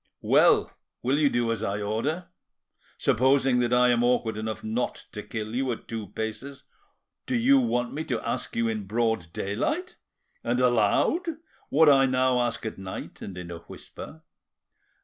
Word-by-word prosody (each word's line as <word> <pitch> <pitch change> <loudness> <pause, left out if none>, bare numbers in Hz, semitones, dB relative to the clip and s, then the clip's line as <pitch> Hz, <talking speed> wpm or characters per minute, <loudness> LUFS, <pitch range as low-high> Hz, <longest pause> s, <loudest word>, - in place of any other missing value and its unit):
Well, - - +4 0.3
will 135 +4 +2
you 145 -2 +4
do 120 -2 0
as 115 -2 -2
I 100 -2 -2
order? 115 - -2 0.7
Supposing 130 0 +3
that 120 -1 +1
I 125 0 +5
am 120 -1 +3
awkward 120 -3 +1
enough 110 0 -4
not 115 +3 -3
to 105 - -6
kill 110 0 -6
you 130 +1 0
at - - -11
two 110 -3 -5
paces, 110 +8 -6 0.6
do 255 - 0
you 265 +4 +5
want 125 - 0
me 155 - -3
to - - -1
ask - - -3
you 115 0 +1
in 110 -3 -3
broad 110 -5 0
daylight 300 - -2 0.5
and 120 +1 0
aloud 125 - +2 0.4
what 160 +2 +5
I 135 -2 +6
now 130 -1 +2
ask 120 -1 -2
at 110 - -5
night 95 -1 -7
and 95 -3 -7
in 90 -1 -7
a 85 - -7
whisper? 160 - -11
120 Hz, 170 wpm, -26 LUFS, 110-135 Hz, 0.7 s, I